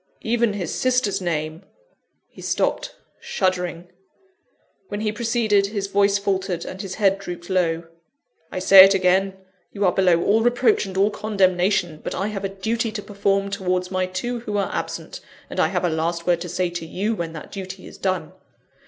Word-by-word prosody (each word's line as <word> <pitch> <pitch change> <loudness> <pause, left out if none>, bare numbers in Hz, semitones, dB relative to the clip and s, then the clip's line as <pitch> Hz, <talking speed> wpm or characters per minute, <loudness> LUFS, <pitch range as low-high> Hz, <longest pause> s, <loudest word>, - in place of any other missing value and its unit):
Even 230 -1 +1
his 185 -5 -3
sister's 250 -6 +1
name 160 -1 -2 0.4
" - - -49
He - - -11
stopped, - - -1 0.2
shuddering. 180 -2 -2 1.0
When 205 - -4
he 215 -1 0
proceeded, 220 -3 +1
his 200 -1 -3
voice 200 0 +2
faltered, 195 -3 -2
and 190 - -6
his 190 -3 -6
head 195 -2 +2
drooped 175 -1 -7
low. 170 -3 +1 0.7
"I - - -5
say 190 +1 +9
it 195 +1 +5
again: 190 +1 +2 0.3
you 200 -1 -1
are 180 - +4
below 180 -2 +3
all 220 +3 +3
reproach 240 -3 +2
and 190 0 -6
all 200 +2 +3
condemnation; 185 -5 +1
but - - -4
I 195 +3 -1
have 200 -2 -5
a 195 - -1
duty 220 +4 -2
to 205 -2 -5
perform 200 -1 0
towards 180 -1 -1
my 185 -1 0
two 240 +7 -3
who 210 -3 -3
are 200 - -1
absent, - - -5 0.3
and - - -4
I - - +4
have - - -1
a - - +2
last 165 +1 -2
word 175 -1 +2
to 175 - -5
say 180 +1 -1
to 170 -1 -5
you 205 +7 -1
when 170 -5 -4
that 155 - -9
duty 190 -1 -7
is - - -12
done. 185 -2 -1
195 Hz, 190 wpm, -22 LUFS, 180-205 Hz, 1.0 s, say